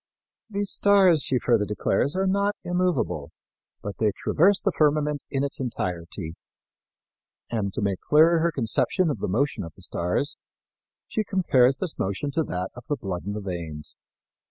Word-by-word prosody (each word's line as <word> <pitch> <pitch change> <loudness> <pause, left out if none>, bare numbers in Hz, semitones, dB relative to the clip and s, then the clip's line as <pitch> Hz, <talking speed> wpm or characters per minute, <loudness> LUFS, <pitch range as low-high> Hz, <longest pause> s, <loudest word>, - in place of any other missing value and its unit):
These 200 -1 -1
stars, 190 -6 +5
she 130 - +1
further 120 -3 +2
declares, 105 - 0
are 190 +1 +1
not 200 +2 +1
immovable, 180 -5 0 0.5
but 100 -1 -6
they 110 - +3
traverse 195 +5 +3
the 195 - 0
firmament 150 -2 +1
in 135 -1 -1
its 140 - -3
entirety. 90 -8 -3 1.2
And 105 -4 -1
to - - -2
make 100 -2 0
clearer 165 +3 +5
her 170 +1 +2
conception 155 - +1
of 115 - -4
the - - -2
motion 125 +7 0
of 85 -3 -9
the 95 - -9
stars, 90 - -1 0.7
she 215 - -1
compares 135 -10 +3
this 175 +2 -3
motion 100 +10 -2
to 160 - 0
that 90 +1 -3
of 120 -1 -12
the 145 - +1
blood 95 -7 -5
in 100 - -2
the 105 - -4
veins. 85 -6 -6
135 Hz, 165 wpm, -25 LUFS, -, 1.2 s, stars